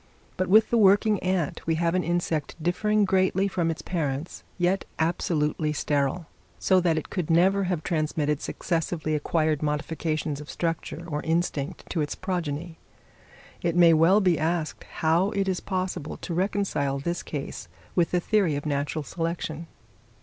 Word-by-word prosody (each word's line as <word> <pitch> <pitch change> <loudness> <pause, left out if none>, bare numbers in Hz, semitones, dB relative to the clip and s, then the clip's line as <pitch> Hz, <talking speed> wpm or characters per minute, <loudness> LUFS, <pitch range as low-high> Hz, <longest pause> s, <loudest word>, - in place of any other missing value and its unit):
But 185 - -1
with 220 +3 +5
the 235 - +4
working 205 +1 +5
ant 185 -4 -1
we 165 - +2
have 170 +1 +1
an 185 0 +1
insect 170 -3 -1
differing 210 +6 +2
greatly 190 0 +2
from 175 -4 0
its 165 - -4
parents, 150 -3 -3
yet 180 +2 +1
absolutely 155 -2 0
sterile; 145 +3 0 0.3
so 190 -1 +3
that 170 -3 +2
it 160 - -4
could 180 -5 -2
never 190 +4 +4
have 175 -4 -1
transmitted 155 -3 0
successively 165 -2 -2
acquired 155 0 +1
modifications 155 0 -2
of 150 - -11
structure 165 0 -3
or 150 -2 -2
instinct 160 -4 -2
to 165 - 0
its 145 - -2
progeny. 170 -3 -4 0.8
It 170 -1 0
may 170 -1 +7
well 170 +6 +5
be 180 -5 +3
asked 160 0 -1
how 165 +5 +1
it 195 -1 +1
is 185 -1 0
possible 185 -5 -3
to 175 - -5
reconcile 180 -7 0
this 170 +5 -2
case 145 -3 -6 0.3
with 175 -2 +2
the 180 - +1
theory 190 -4 +2
of 145 - -4
natural 145 +1 -1
selection? 165 0 -4
170 Hz, 155 wpm, -26 LUFS, 155-185 Hz, 0.8 s, may